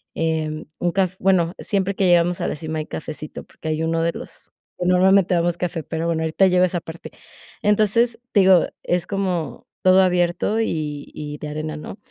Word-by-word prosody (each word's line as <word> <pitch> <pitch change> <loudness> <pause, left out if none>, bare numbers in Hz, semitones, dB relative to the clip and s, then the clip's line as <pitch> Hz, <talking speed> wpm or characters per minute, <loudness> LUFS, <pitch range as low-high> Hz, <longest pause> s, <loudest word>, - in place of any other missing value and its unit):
eh, 155 -1 -2
un 175 - 0
caf 185 0 0
bueno, 180 -3 +2
siempre 200 -1 -1
que 190 - +2
llegamos 175 0 +3
a - - 0
la - - -2
cima 155 +1 -4
hay 155 - -5
cafecito 155 -1 -7
porque - - -11
hay 155 +1 -1
uno 165 0 0
de 170 0 0
los - - -11 0.3
pues, 180 - 0
normalmente 190 +1 +4
damos 170 0 +1
café, 170 -2 -3
pero 160 +2 -3
bueno, 165 -1 0
ahorita 160 +4 +3
llego 180 0 +3
a - - +5
esa 175 -1 -3
parte. 160 +1 -10 0.5
Entonces 215 +3 +2
te 205 - +5
digo, 185 -2 +5 0.2
es 175 0 -1
como 185 -5 -3 0.2
todo 185 0 +6
abierto 180 +3 +1
y 150 -7 -3
y 150 0 -6
de 150 - -6
arena, 155 +1 -4
¿no?, 155 - -8
175 Hz, 200 wpm, -22 LUFS, 160-190 Hz, 0.5 s, todo